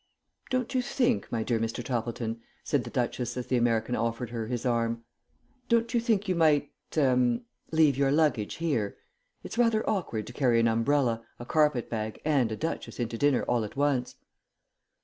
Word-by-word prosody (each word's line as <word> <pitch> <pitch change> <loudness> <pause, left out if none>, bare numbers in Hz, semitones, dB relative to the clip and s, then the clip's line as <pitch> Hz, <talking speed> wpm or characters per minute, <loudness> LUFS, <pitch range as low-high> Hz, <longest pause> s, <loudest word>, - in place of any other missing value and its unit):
"Don't 255 0 -1
you 255 - +2
think, 245 -1 0
my 115 -2 0
dear 115 0 0
Mr. 115 +2 -2
Toppleton," 115 -2 -3 0.2
said - - 0
the - - -6
Duchess 120 0 -2
as 125 - -3
the 130 - 0
American 120 0 +1
offered 115 +1 -2
her 115 -2 -3
his 120 +1 -3
arm, 115 -1 0 0.7
"don't 235 0 +2
you 240 - +3
think 220 -3 +1
you 185 - +2
might 155 -4 +3 0.3
ah 125 -4 +4 0.4
leave 155 -4 +4
your 140 -1 +3
luggage 145 -8 +2
here? 140 -12 -1 0.5
It's 235 - -6
rather 230 -2 +3
awkward 145 - -1
to 120 - -9
carry 120 -3 +3
an 115 - +4
umbrella, 115 0 +1
a 120 - -8
carpet 150 -3 +2
bag, 110 -1 -4
and 135 -7 +2
a - - -1
Duchess 160 +1 -4
into 115 -1 -2
dinner 140 +2 +2
all 120 -2 +1
at 105 - -7
once." 140 -3 0
125 Hz, 180 wpm, -28 LUFS, 115-155 Hz, 0.7 s, ah